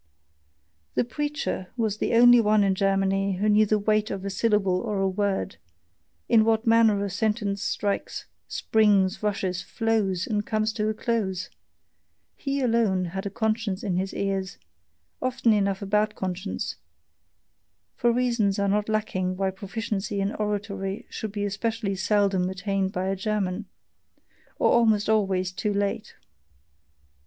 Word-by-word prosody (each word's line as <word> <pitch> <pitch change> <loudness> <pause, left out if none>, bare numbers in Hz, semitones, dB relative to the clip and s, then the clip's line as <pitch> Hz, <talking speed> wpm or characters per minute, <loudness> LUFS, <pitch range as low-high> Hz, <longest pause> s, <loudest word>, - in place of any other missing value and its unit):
The - - +3
preacher 290 -6 -3
was 215 -3 -1
the - - 0
only 245 0 +7
one 210 -1 +3
in 195 -1 +2
Germany 195 0 +1
who 195 +3 -1
knew 215 0 +4
the 215 - +3
weight 215 +1 +1
of 195 -1 -5
a 200 - -2
syllable 195 -3 +1
or 210 -3 -2
a 195 - +2
word, 195 0 -1 0.7
in 220 -1 +5
what 225 0 +1
manner 225 -3 +4
a - - -2
sentence 205 0 -1
strikes, 200 0 -2 0.2
springs, 205 -3 +2
rushes, 195 -4 -1
flows, 200 -3 0
and 210 -3 -1
comes 215 0 -1
to 215 -1 -1
a 215 - -2
close; 205 -6 -2 0.8
he 275 0 -2
alone 225 -7 +2
had 195 +1 -3
a - - -2
conscience 215 -1 -1
in 185 -4 -1
his 190 +1 -1
ears, 195 -2 -2 0.6
often 255 -3 +2
enough 200 -1 0
a - - -4
bad 210 +2 +1
conscience: 190 +1 -4 1.2
for 240 -1 +2
reasons 235 -5 +1
are 200 0 +1
not 210 +2 0
lacking 185 -4 -1
why 195 0 0
proficiency 200 +1 -4
in 195 +1 -1
oratory 205 0 -3
should 220 -3 -5
be 205 0 -2
especially 210 +1 -2
seldom 195 -2 +1
attained 190 0 -1
by 185 -1 -2
a 195 - 0
German, 200 0 -2 0.9
or - - +3
almost 220 -3 +3
always 190 -4 +1
too 205 +3 -2
late. 200 0 -2
205 Hz, 145 wpm, -26 LUFS, 195-220 Hz, 1.2 s, only